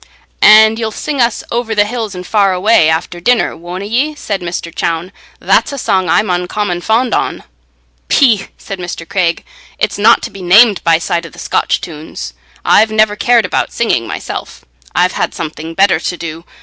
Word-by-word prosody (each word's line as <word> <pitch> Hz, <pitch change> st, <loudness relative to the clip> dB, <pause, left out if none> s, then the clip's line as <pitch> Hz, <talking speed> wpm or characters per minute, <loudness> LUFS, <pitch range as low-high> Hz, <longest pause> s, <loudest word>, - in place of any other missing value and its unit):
"And 220 Hz, +1 st, +7 dB
ye'll 225 Hz, -1 st, -1 dB
sing 275 Hz, +5 st, -3 dB
us 235 Hz, -2 st, 0 dB
'Over 235 Hz, -2 st, -2 dB
the 205 Hz, 0 st, +3 dB
hills 220 Hz, -3 st, -4 dB
and 180 Hz, 0 st, -7 dB
far 200 Hz, -1 st, +2 dB
away,' 185 Hz, -3 st, +3 dB
after 165 Hz, +2 st, -2 dB
dinner, 240 Hz, +7 st, +1 dB
wonna 180 Hz, +3 st, -7 dB
ye?" 265 Hz, +8 st, -1 dB
said 200 Hz, -9 st, -4 dB
Mr. 170 Hz, -1 st, -5 dB
Chowne. 165 Hz, +3 st, -2 dB, 0.3 s
"That's -, -, +2 dB
a 280 Hz, -, -5 dB
song 190 Hz, -7 st, 0 dB
I'm 210 Hz, +5 st, +2 dB
uncommon 180 Hz, 0 st, -2 dB
fond 225 Hz, +5 st, +1 dB
on." -, -, -1 dB, 0.7 s
"Peeh!" 225 Hz, -8 st, +3 dB
said 195 Hz, -3 st, -8 dB
Mr. 175 Hz, -2 st, -6 dB
Craig; 170 Hz, -3 st, -1 dB, 0.3 s
"it's -, -, -1 dB
not -, -, +4 dB
to -, -, -5 dB
be 195 Hz, -, -10 dB
named 200 Hz, +3 st, +5 dB
by 165 Hz, -1 st, +4 dB
side 170 Hz, 0 st, -2 dB
o' -, -, -12 dB
the -, -, -18 dB
Scotch -, -, -1 dB
tunes. 150 Hz, -, -8 dB, 0.3 s
I've 220 Hz, +1 st, +4 dB
never 215 Hz, -1 st, +2 dB
cared 235 Hz, +1 st, +3 dB
about -, -, -1 dB
singing 125 Hz, -, 0 dB
myself; -, -, -7 dB, 0.3 s
I've -, -, +3 dB
had -, -, -2 dB
something 160 Hz, +1 st, -6 dB
better 195 Hz, -3 st, +3 dB
to 175 Hz, +1 st, -4 dB
do. 165 Hz, 0 st, -7 dB
195 Hz, 185 wpm, -14 LUFS, 170-220 Hz, 0.7 s, And